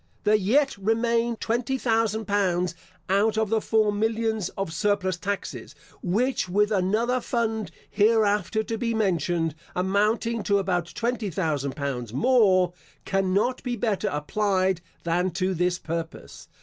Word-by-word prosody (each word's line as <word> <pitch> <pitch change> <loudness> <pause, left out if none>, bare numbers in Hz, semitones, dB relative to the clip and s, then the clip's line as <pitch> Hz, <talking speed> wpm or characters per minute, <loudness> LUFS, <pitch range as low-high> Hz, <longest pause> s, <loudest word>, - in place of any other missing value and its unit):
There 210 - +3
yet 245 +8 +3
remain 230 +3 +1
twenty 235 +4 -1
thousand 225 -3 0
pounds 180 -3 +1 0.3
out 210 +3 +2
of 220 -2 +1
the 220 -1 +2
four 215 -1 +2
millions 220 -2 0
of 195 -5 -3
surplus 200 -2 +1
taxes, 175 - -5 0.3
which 220 +3 0
with 210 +3 +2
another 215 +6 +1
fund 225 -5 -1 0.2
hereafter 215 0 +2
to 225 0 -4
be 230 -1 -1
mentioned, 175 -5 0 0.2
amounting 210 +5 +1
to 200 - +3
about 180 -3 0
twenty 235 -3 -1
thousand 150 -6 -2
pounds 125 -5 -4
more, 185 - +4 0.3
cannot 195 +6 +1
be 245 -1 -2
better 220 -3 -1
applied 185 +4 0 0.2
than 175 +2 +1
to 185 +1 0
this 180 +1 0
purpose. 165 -1 -6
205 Hz, 135 wpm, -25 LUFS, 180-225 Hz, 0.3 s, more